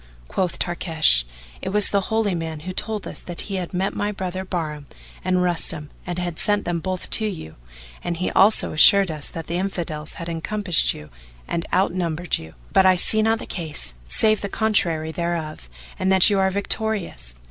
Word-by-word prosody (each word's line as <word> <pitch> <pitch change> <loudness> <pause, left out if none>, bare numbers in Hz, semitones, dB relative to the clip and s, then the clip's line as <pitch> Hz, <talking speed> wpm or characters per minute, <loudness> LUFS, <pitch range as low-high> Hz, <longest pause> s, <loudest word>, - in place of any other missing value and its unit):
Quoth 180 - -1
Tarkash; 160 - +2 0.4
"It - - -3
was 210 +1 +3
the 200 -2 0
Holy 220 -3 +1
Man 160 -2 -4
who 185 +3 -6
told 215 +2 -1
us - - -7
that 175 -1 -6
he 195 -2 -4
had 180 -2 -4
met 190 +2 -1
my 205 0 -1
brother 185 -2 -4
Bahram 155 -6 -4 0.4
and 185 0 +1
Rustam 165 -4 0 0.2
and 175 0 -3
had 175 -2 -3
sent 205 -1 +2
them 170 -1 -1
both 185 +1 -3
to 220 - +3
you 160 - -7 0.5
and 170 -1 -2
he 180 - -1
also 210 +3 +3
assured 195 +3 +6
us 150 -2 -4
that 165 -1 -7
the 170 - -3
Infidels 165 -5 -4
had 170 - -7
encompassed 175 +2 +2
you 75 0 -12 0.4
and 170 - -3
out 190 -1 +2
numbered 175 -1 -1
you; 80 0 -12 0.2
but 190 - +6
I 185 - +6
see 215 +4 +4
not 225 +1 +2
the - - -8
case 155 - -4
save 215 - +2
the 200 - -3
contrary 170 -8 +1
thereof 160 - -4 0.3
and 190 - +1
that 190 +2 +7
you 200 - +2
are 190 0 +3
victorious." 200 - -1
180 Hz, 190 wpm, -22 LUFS, 160-195 Hz, 0.5 s, that